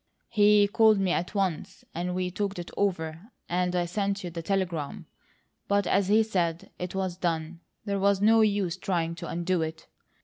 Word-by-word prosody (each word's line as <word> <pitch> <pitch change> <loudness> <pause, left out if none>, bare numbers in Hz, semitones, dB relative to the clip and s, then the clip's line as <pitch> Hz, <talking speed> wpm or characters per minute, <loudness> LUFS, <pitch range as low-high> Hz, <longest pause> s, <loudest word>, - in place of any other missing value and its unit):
"He 210 -2 +5
called 220 +1 +4
me 190 -2 +1
at 180 +3 -2
once, 190 -6 -2
and 180 +2 -3
we 180 0 -1
talked 200 +1 -3
it 175 0 -6
over 170 -1 -2 0.2
and 180 0 0
I 175 -1 +1
sent 200 +2 -2
you 175 - -5
the 165 0 -5
telegram; 175 -5 -2 0.6
but 200 -1 +2
as 195 +1 +2
he 215 +2 +5
said, 175 -6 -2
it 180 +1 -5
was 190 -2 -2
done; 165 -1 -2 0.3
there 200 -1 -1
was 200 0 +3
no 220 +2 +5
use 200 -5 +1
trying 170 -3 -1
to 170 0 -7
undo 175 +1 -1
it. 160 0 -4
185 Hz, 180 wpm, -27 LUFS, 170-200 Hz, 0.6 s, He